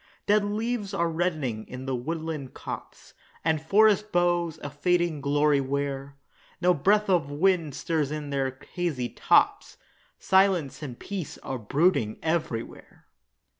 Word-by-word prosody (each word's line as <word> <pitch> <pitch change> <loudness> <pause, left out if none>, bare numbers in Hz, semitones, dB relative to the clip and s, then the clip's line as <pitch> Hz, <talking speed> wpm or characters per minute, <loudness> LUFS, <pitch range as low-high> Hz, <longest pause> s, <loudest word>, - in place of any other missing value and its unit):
Dead 210 0 +4
leaves 210 0 -2
are 170 -2 +1
reddening 155 -10 -1
in 130 +1 -7
the 135 -1 -1
woodland 155 +1 -4
copse, - - -8 0.3
And 160 -2 +2
forest 210 +4 +4
boughs 175 -2 +1
a 145 - -5
fading 170 +1 +1
glory 145 0 +3
wear; 140 0 -3 0.4
No 180 +1 +4
breath 205 +7 +2
of 175 -7 +2
wind 165 -1 +1
stirs 155 -4 -1
in 150 -1 -5
their 135 -1 -1 0.2
hazy 155 -9 -1
tops, - - +2 0.4
Silence 190 -8 +2
and 130 -5 -6
peace 190 -6 -6
are 130 - -4
brooding 115 - +1
everywhere. 160 -8 -3
160 Hz, 130 wpm, -27 LUFS, 140-180 Hz, 0.4 s, Dead